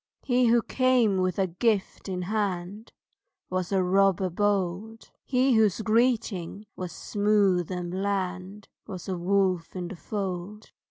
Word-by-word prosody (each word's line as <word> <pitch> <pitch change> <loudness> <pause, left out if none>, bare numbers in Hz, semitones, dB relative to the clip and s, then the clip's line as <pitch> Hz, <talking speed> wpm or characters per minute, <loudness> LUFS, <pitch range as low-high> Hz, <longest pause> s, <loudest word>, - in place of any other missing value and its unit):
He 250 -1 +2
who 235 0 +4
came 250 -6 +2
with 185 -1 0
a 195 - +2
gift 195 +2 -1
in 180 -1 -3
hand 200 +1 -3 0.6
Was 185 0 -2
a 190 -1 +2
robber 190 0 +2
bold. 205 +3 -2
He 260 0 +2
whose 220 -4 +3
greeting 220 -4 0
was 180 -2 -5
smooth 200 -2 +1
and 180 -1 -4
bland 190 +1 -3 0.2
Was 185 -2 -7
a 190 - -2
wolf 185 -1 0
in 180 -1 -4
the 195 - -7
fold. 195 +2 -5
195 Hz, 140 wpm, -27 LUFS, 180-215 Hz, 0.6 s, who